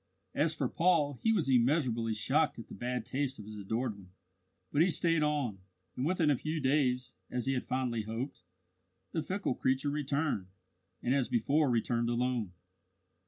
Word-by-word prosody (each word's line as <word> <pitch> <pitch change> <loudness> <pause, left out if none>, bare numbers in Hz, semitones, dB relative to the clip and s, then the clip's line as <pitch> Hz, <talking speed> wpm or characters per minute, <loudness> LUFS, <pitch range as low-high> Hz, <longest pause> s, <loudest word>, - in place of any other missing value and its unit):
As - - +1
for - - 0
Paul, 160 -6 +2
he 225 - +3
was 195 -10 +2
immeasurably 120 -3 +2
shocked 130 +9 +2
at 115 - -9
the - - -9
bad 125 +4 -3
taste 135 0 -2
of 105 - -9
his 110 0 -8
adored 110 +3 -2
one; 95 -2 -15 0.6
but 145 - +3
he 180 - +5
stayed 165 0 +2
on, 145 -9 0 0.4
and 125 - -2
within 165 -4 +3
a - - +4
few 155 +1 -2
days, 130 -3 +1 0.2
as 125 -2 -2
he 135 - +1
had 125 - -2
fondly 125 -3 0
hoped, 115 +6 -5 0.7
the 160 - -1
fickle 190 -1 -1
creature 130 +3 0
returned 145 -7 -1 0.6
and, 125 - +2
as 135 -3 +2
before, 140 +5 +2
returned 120 0 +1
alone. 120 -4 0
130 Hz, 170 wpm, -32 LUFS, 120-150 Hz, 0.7 s, he